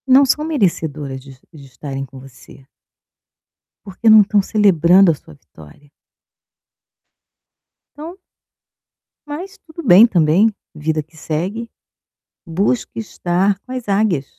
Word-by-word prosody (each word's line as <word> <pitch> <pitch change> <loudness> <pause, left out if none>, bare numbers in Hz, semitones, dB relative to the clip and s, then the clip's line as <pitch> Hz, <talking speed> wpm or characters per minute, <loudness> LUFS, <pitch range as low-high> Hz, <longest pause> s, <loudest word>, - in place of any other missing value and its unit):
Não 270 +2 +6
são 300 +3 0
merecedoras 160 - -2
de 135 -1 -15 0.2
de 145 -3 -13
estarem 135 +1 -7
com 135 0 -14
você. 130 0 -16 1.2
Porque, 215 +3 +1
não 215 0 +8
estão 205 0 +2
celebrando 190 -3 +4
a - - -3
sua 80 - -17
vitória. 80 - -18 2.1
Então 330 +5 -9 1.1
Mas 365 +7 -8
tudo 335 -2 -12
bem, 195 +4 +8
também. 175 +2 +3 0.2
Vida 155 0 -3
que 160 +2 -27
segue, 185 +10 -4 0.8
busque 200 +9 -2
estar 190 -2 -1
com 255 - -15
as 255 -3 -6
águias. 195 -8 0
185 Hz, 115 wpm, -18 LUFS, 150-225 Hz, 2.1 s, não